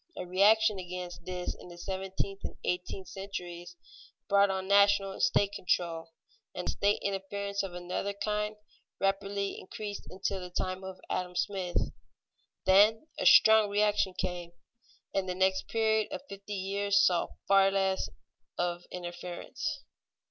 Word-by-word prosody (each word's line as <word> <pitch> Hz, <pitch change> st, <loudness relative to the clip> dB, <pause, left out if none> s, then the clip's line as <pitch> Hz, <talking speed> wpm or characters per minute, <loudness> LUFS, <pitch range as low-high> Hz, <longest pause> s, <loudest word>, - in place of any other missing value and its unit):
A -, -, -4 dB
reaction 205 Hz, +3 st, +4 dB
against 180 Hz, -1 st, -7 dB
this 180 Hz, -1 st, -3 dB
in -, -, -13 dB
the 175 Hz, -, -11 dB
seventeenth 190 Hz, +1 st, -4 dB
and -, -, -5 dB
eighteenth 180 Hz, +1 st, -3 dB
centuries 175 Hz, -3 st, -7 dB, 0.5 s
brought 200 Hz, 0 st, +5 dB
on 190 Hz, 0 st, -2 dB
national 200 Hz, 0 st, +5 dB
and -, -, -7 dB
state 200 Hz, -1 st, +3 dB
control, 170 Hz, -4 st, -1 dB, 0.5 s
and 180 Hz, -, -4 dB
state 205 Hz, +1 st, +2 dB
interference 200 Hz, +1 st, -2 dB
of 190 Hz, -3 st, -6 dB
another 180 Hz, +3 st, -3 dB
kind 210 Hz, +1 st, -2 dB, 0.4 s
rapidly 195 Hz, 0 st, -1 dB
increased 210 Hz, 0 st, -7 dB
until 190 Hz, +1 st, -2 dB
the 180 Hz, -1 st, -7 dB
time 185 Hz, +1 st, -3 dB
of 190 Hz, -1 st, -7 dB
Adam 180 Hz, -1 st, -3 dB
Smith. 185 Hz, -2 st, -1 dB, 0.7 s
Then 210 Hz, +9 st, +5 dB
a -, -, +3 dB
strong 220 Hz, -1 st, +7 dB
reaction 205 Hz, -2 st, +2 dB
came, 175 Hz, -1 st, -4 dB, 0.6 s
and 190 Hz, -1 st, 0 dB
the 180 Hz, -, -2 dB
next 190 Hz, 0 st, +1 dB
period 220 Hz, -1 st, +2 dB
of -, -, -4 dB
fifty 200 Hz, +1 st, -7 dB
years 200 Hz, +1 st, +1 dB
saw 180 Hz, -4 st, +3 dB, 0.2 s
far 195 Hz, 0 st, +6 dB
less 195 Hz, -1 st, 0 dB, 0.5 s
of 175 Hz, 0 st, -1 dB
interference. 175 Hz, 0 st, -5 dB
195 Hz, 140 wpm, -30 LUFS, 180-200 Hz, 0.7 s, strong